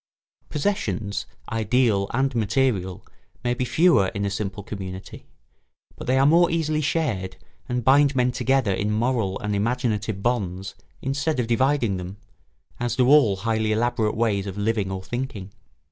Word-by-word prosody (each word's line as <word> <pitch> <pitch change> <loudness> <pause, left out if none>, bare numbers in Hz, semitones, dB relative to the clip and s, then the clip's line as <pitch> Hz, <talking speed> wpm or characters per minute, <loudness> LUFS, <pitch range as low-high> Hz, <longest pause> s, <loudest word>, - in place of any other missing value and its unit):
Possessions, 105 - -2 0.2
ideal 110 -2 +1
and 130 +2 0
material, 110 -5 0 0.4
may 120 - +1
be 125 +1 -2
fewer 130 - +4
in 100 0 -1
a 100 - -1
simple 100 0 -4
community, 95 -2 -8 0.7
but - - -9
they 130 +1 +3
are 135 - +4
more 170 +4 +5
easily 155 -2 0
shared 130 - -1 0.3
and 125 0 -1
bind 140 +2 +4
men 125 -1 +2
together 130 -4 +1
in 100 +2 -1
moral 110 -3 0
and 105 0 -1
imaginative 110 -2 -1
bonds 100 -5 -1 0.3
instead 140 +2 -1
of 125 - +1
dividing 120 -3 +1
them, 90 +2 -7 0.6
as 120 -1 -1
do 125 -1 +3
all 140 -9 +6
highly 110 +2 -1
elaborate 115 -1 0
ways 105 -4 0
of 95 0 -6
living 105 -1 0
or 95 0 -5
thinking. 120 -3 -5
115 Hz, 150 wpm, -24 LUFS, 100-130 Hz, 0.7 s, all